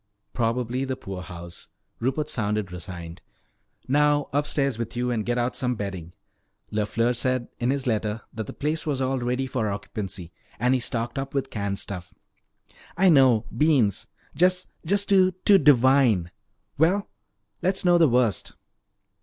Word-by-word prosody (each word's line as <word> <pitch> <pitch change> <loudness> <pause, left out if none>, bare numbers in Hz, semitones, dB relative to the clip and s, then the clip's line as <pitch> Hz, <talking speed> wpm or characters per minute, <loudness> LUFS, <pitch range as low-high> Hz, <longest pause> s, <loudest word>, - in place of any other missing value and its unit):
"Probably 120 +2 -1
the 130 -1 -2
poorhouse." 90 -4 -9 0.3
Rupert 135 +5 -1
sounded 105 -8 -1
resigned. 85 -1 -8 0.7
"Now 145 +1 +2
upstairs 140 -3 0
with 115 0 -4
you 125 0 0
and 110 -3 -1
get 120 +2 -1
out 120 +1 0
some 125 -1 -1
bedding. 95 -5 -6 0.6
LeFleur 110 +3 0
said 130 0 -1
in 120 - 0
his 140 0 -1
letter 110 -2 -1
that 110 -2 -5
the - - -5
place 155 +2 -2
was 140 -3 0
all 130 0 0
ready 125 +2 -1
for 125 -5 -1
occupancy. 100 -3 -5 0.3
And 125 +2 +2
he 130 - +2
stocked 120 +2 -3
up 135 +1 -5
with 135 -1 -1
canned 100 -2 -2
stuff." 90 -3 -7 0.8
"I 190 +1 +5
know 130 -7 +5
beans! 140 - +2 0.3
Just 180 +1 +2 0.4
too, 185 -2 +4
too 200 -1 +7
divine. 130 - +4 0.5
Well, 185 +6 +3 0.5
let's 190 +1 0
know 175 -1 +5
the 165 -4 +5
worst." 120 -4 +1
125 Hz, 145 wpm, -25 LUFS, 105-140 Hz, 0.8 s, too